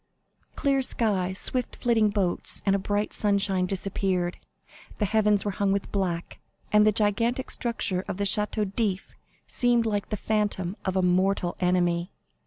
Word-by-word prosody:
Clear 275 -2 +1
sky, 205 -7 0
swift 245 +6 -1
flitting 225 -3 +2
boats, 200 -4 0
and 195 -1 +2
brilliant 205 +2 -1
sunshine 200 -3 +2
disappeared; 185 -2 -2 0.6
the 210 - 0
heavens 210 -1 +2
were 205 - 0
hung 195 +1 0
with 200 0 -2
black, 180 -4 -3 0.3
and 210 0 +5
the - - +5
gigantic 230 +5 0
structure 200 -6 -1
of - - -4
the 200 - -1
Château 210 0 +1
d'If 200 -4 -2 0.3
seemed 240 -2 +2
like 205 -2 -2
the 210 - -2
phantom 205 -3 -1
of 190 -1 -1
a 190 - +2
mortal 180 0 +1
enemy. 175 -1 +1
200 Hz, 150 wpm, -26 LUFS, 185-215 Hz, 0.6 s, and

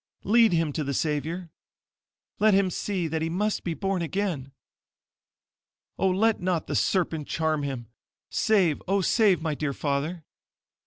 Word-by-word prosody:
Lead 225 +2 +5
him 165 -3 +1
to 155 - -2
the 140 -1 -2
Savior. 160 +4 -2 0.9
Let 215 -1 +5
him 195 -1 +2
see 185 -2 -2
that 160 0 -2
he 165 - -1
MUST 205 +5 -1
BE 170 -2 -2
BORN 195 -1 -1
AGAIN. 170 -6 -2 1.5
Oh 190 - +3
let 215 +3 +2
not 180 -3 0
the - - -4
SERPENT 165 -5 0
CHARM 160 -2 0
HIM! 135 -4 -4 0.5
Save, 190 -9 +2
oh, 195 +1 +2
save 190 -3 +3
my 160 -2 0
dear 145 -1 -2
father!" 150 +5 -2
170 Hz, 150 wpm, -26 LUFS, 155-195 Hz, 1.5 s, Lead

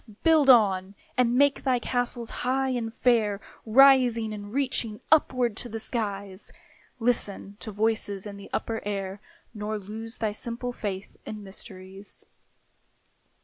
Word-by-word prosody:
Build 315 -4 +5
on, 200 -5 +5 0.2
and 245 -1 +3
make 285 +1 +4
thy 260 -2 +2
castles 245 -1 -1
high 265 +1 +1
and 240 -3 -2
fair, 220 -4 +2 0.3
Rising 245 -3 +5
and 205 -1 -7
reaching 245 -4 -1
upward 255 -7 +3
to 245 - -2
the 225 - -5
skies; 200 -4 -4 0.5
Listen 225 -4 0
to 215 - -5
voices 210 -2 -1
in 205 -1 -7
the 200 0 -11
upper 225 -1 -2
air, 195 -1 -4 0.3
Nor 215 0 -3
lose 220 +3 -6
thy 220 -2 -1
simple 235 +3 -5
faith 200 -4 -5
in 210 -1 -7
mysteries. 195 0 -7
225 Hz, 135 wpm, -27 LUFS, 205-245 Hz, 0.5 s, Build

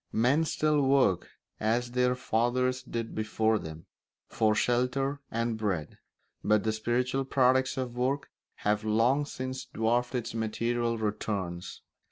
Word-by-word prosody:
Men 135 +8 +3
still 150 -1 +1
work, 135 -9 +3 0.3
as 120 +3 0
their 125 0 +2
fathers 125 +2 0
did 115 -1 -5
before 110 0 +1
them, 80 0 -8 0.4
for 110 -1 +2
shelter 125 +5 +1
and 115 -1 -1
bread; 95 -8 -2 0.4
but 105 -1 +3
the 110 - +1
spiritual 125 +4 0
products 130 0 +2
of 125 -2 -3
work 130 +3 -1 0.3
have 105 +1 +2
long 115 +7 +2
since 130 -1 -5
dwarfed 120 +3 0
its 120 -3 -3
material 115 +1 -1
returns. 100 -4 -3
120 Hz, 130 wpm, -29 LUFS, 110-130 Hz, 0.4 s, Men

